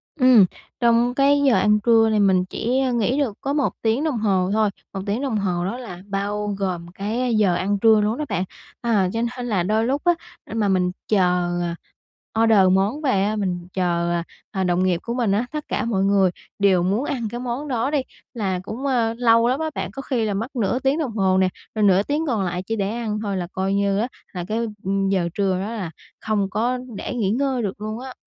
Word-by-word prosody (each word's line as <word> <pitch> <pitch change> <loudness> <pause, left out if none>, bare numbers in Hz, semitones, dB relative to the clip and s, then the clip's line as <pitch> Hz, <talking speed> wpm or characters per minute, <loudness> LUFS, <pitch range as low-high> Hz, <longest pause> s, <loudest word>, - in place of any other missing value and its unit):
Ừm, 255 - +6 0.3
trong 235 0 +3
cái 280 +1 +4
giờ 250 - +5
ăn 210 0 +3
trưa 225 -2 +5
thì 215 - +2
mình 190 -2 +3
chỉ 245 +7 -1
nghỉ 240 +3 +1
được 240 -8 -1
có 275 - -1
1 290 -2 +1
tiếng 225 +5 +1
đồng 305 -6 0
hồ 190 -4 +1
thôi. 215 -1 +3 0.2
1 195 - -4
tiếng 210 +4 -1
đồng 265 -6 -1
hồ 180 -3 -1
đó 210 +6 -3
là 185 -8 -8
bao 205 +1 -2
gồm 180 -3 -3
cái 220 +7 -2
giờ 205 -4 +3
ăn 200 +3 0
trưa 220 0 +5
luôn 215 +3 0
đó 300 - -2
bạn. 185 -3 0 0.4
Ờ, 210 -6 +2
cho 225 - -1 0.2
nên 245 -1 -4
là 200 -6 +1
đôi 215 +4 +1
lúc 275 +4 0
á, 350 - +5 0.4
mà 220 -2 +1
mình 185 -2 +2 0.2
chờ 180 -3 +2 0.9
order 225 -2 +5
món 200 +10 +1
về 235 -10 +2
á, 210 +2 0
mình 180 -4 -2
chờ 175 -2 0 0.5
đồng 180 +1 +2
nghiệp 180 -2 +1
của 235 - -3
mình 240 -5 0
á, 210 +5 +1
tất 300 -1 -4
cả - - -1
mọi 200 -5 0
người 195 -1 +4 0.3
đều 190 -3 +4
muốn 200 +9 0
ăn 240 -6 -2
cái 240 - -5
món 250 +4 -4
đó 255 0 -1
đi, 295 -2 +2 0.3
là 195 -6 -1
cũng, 230 +7 -6
ờ, 235 -4 +1
lâu 230 -1 +4
lắm 255 +3 +1
á 320 0 -1
bạn, - - -3
có 275 - -6
khi 250 -5 -1
là 210 - -1
mất 225 +8 -4
nửa 235 +1 0
tiếng 270 +4 +1
đồng 285 -7 -1
hồ 190 -2 +3
nè, 190 0 +3 0.3
rồi 215 - +1
nửa 195 -1 +5
tiếng 300 +6 -1
còn 225 -7 0
lại 180 0 -2
chỉ 225 +4 -3
để 200 -2 -1
ăn 220 -2 -3
thôi 200 -2 -2
là 175 -1 -3
coi 190 +1 -1
như 200 0 +1
á, 230 - 0 0.3
là 180 -2 -4
cái 220 +2 -1 0.5
giờ 185 -3 +1
trưa 195 -2 +1
đó 205 +3 -4
là 190 -8 -4 0.3
không 205 -3 -1
có 240 +6 0 0.2
để - - -4
nghỉ 215 -5 0
ngơi 260 +1 0
được 205 -1 -4
luôn 215 +1 -4
á. 260 0 -8
215 Hz, 225 wpm, -22 LUFS, 195-245 Hz, 0.9 s, Ừm